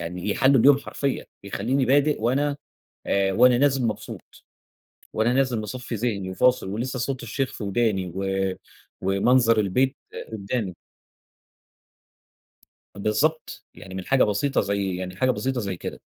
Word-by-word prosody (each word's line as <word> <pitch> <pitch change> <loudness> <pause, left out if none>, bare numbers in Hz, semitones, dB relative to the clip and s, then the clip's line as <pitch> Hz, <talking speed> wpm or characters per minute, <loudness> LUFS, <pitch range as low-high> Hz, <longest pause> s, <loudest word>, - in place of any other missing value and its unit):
يعني 90 +4 -5
يحَلّوا 135 +4 +4
اليوم 140 +2 +6
حرفيًا، 140 -1 -3 0.2
يخلوني 120 +7 0
بادئ 145 +3 +3
وأنا 140 +5 +1 0.5
آآ، 100 -1 +1
وأنا 125 +4 +5
نازل 135 -2 +2
مبسوط، 110 - -5 0.9
وأنا 110 +2 +1
نازل 130 -3 +1
مصفي 120 +3 -6
ذهني 100 -4 -2
وفاصل 125 +2 +2
ولسه 120 +6 -3
صوت 130 +1 -3
الشيخ 130 +3 -2
في - - -6
وداني 100 -3 0
و 95 0 -1 0.5
ومنظر 115 +4 +3
البيت 130 +8 +1 0.4
قدّامي. 100 -2 -3 2.2
بالضبط، 110 +11 -1
يعني 95 - -11
من 95 -1 -5
حاجة 135 -1 +4
بسيطة 125 +7 +1
زي 100 -2 -1
يعني 90 0 -5
حاجة 130 +7 +2
بسيطة 130 0 -2
زي 100 -4 -4
كده، - - -7
115 Hz, 135 wpm, -24 LUFS, 100-130 Hz, 2.2 s, اليوم